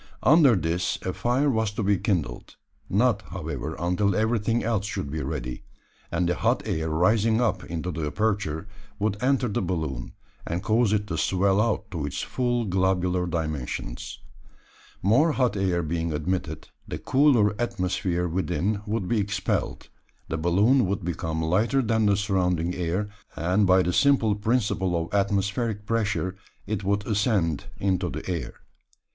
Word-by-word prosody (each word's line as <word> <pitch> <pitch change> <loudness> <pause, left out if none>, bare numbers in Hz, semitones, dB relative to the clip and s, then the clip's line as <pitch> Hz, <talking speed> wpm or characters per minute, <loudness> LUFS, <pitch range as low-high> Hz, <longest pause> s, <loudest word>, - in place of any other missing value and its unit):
Under 145 -4 +6
this 85 0 -1
a 95 - -2
fire 125 +4 +1
was 110 -3 +1
to 105 - -2
be 100 -1 +2
kindled 80 - -2 0.3
not, 110 +1 +2
however, 80 -4 -5
until 90 +3 +1
everything 110 +1 +1
else 110 -3 0
should 70 -8 -4
be 80 +1 -3
ready; 65 -3 -4 0.5
and 85 +1 +1
the 90 - +2
hot - - +1
air 80 0 -1
rising 105 +8 +3
up 120 -2 0
into 85 +2 -4
the 80 -3 -3
aperture 100 -1 -1 0.3
would 105 -1 0
enter 130 -1 +2
the 105 - -1
balloon, 80 -9 -3 0.3
and 85 +3 -3
cause 110 +1 +2
it 105 -1 +1
to 85 -5 -3
swell 95 +2 +2
out 115 -3 -1
to 85 -5 -3
its 75 - -3
full 120 -2 -1
globular 90 -1 +1
dimensions. 75 -7 -4 0.9
More 135 - +4
hot 125 -6 +1
air 90 -3 0
being 80 +1 -2
admitted, 90 +5 -3 0.2
the - - -4
cooler 130 -7 +3
atmosphere 90 -5 -1
within 90 +3 -1
would 105 -3 -1
be 115 +1 +1
expelled, 105 +1 -2 0.4
the 80 - -1
balloon 100 +9 +3
would 95 -2 -2
become 80 -2 -2
lighter 110 +11 +2
than 110 -1 +2
the 100 -1 +3
surrounding 90 -4 0
air, 90 +3 -1 0.3
and 90 +5 +2
by 95 0 +5
the 90 - -1
simple 135 -5 +4
principle 105 -4 0
of 85 +3 -5
atmospheric 100 +2 0
pressure 105 -4 -1 0.3
it 105 -2 -3
would 100 +1 0
ascend 100 - +1
into 95 -2 0
the 75 +1 -6
air. 90 -3 -4
95 Hz, 155 wpm, -26 LUFS, 85-110 Hz, 0.9 s, Under